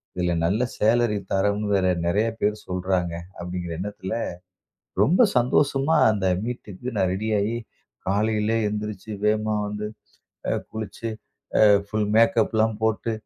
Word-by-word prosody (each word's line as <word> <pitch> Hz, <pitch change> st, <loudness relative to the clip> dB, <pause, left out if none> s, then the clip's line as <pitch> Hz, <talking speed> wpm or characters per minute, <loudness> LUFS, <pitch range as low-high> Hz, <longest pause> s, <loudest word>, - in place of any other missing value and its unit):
இதில 90 Hz, -1 st, 0 dB
நல்ல 100 Hz, +7 st, +1 dB, 0.2 s
சேலரி 115 Hz, 0 st, +3 dB, 0.2 s
தரோம்னு 105 Hz, +2 st, +1 dB
வேற 95 Hz, -1 st, +2 dB, 0.2 s
நிறைய 105 Hz, +6 st, +2 dB
பேர் 105 Hz, +1 st, +2 dB
சொல்றாங்க." 90 Hz, -1 st, -1 dB, 0.3 s
அப்படிங்கிற 90 Hz, -1 st, -4 dB
எண்ணத்தில 100 Hz, -1 st, -5 dB, 0.9 s
ரொம்ப 170 Hz, -, +3 dB, 0.2 s
சந்தோஷமா 135 Hz, +4 st, +2 dB
அந்த 100 Hz, -3 st, 0 dB, 0.2 s
மீட்டுக்கு 120 Hz, 0 st, -6 dB
நான் 95 Hz, -2 st, +2 dB
ரெடியாகி, 105 Hz, +2 st, 0 dB, 0.5 s
காலையிலே 105 Hz, +2 st, +1 dB
எந்திரிச்சு 105 Hz, 0 st, -5 dB, 0.2 s
வேகமா 110 Hz, 0 st, +1 dB
வந்து 105 Hz, 0 st, -4 dB, 0.9 s
குளிச்சு 110 Hz, +1 st, -5 dB, 0.8 s
ஃபுல் 105 Hz, 0 st, -1 dB
மேக்கப்லாம் 110 Hz, -1 st, +3 dB
போட்டு 110 Hz, +1 st, +1 dB
105 Hz, 110 wpm, -24 LUFS, 95-110 Hz, 0.9 s, சேலரி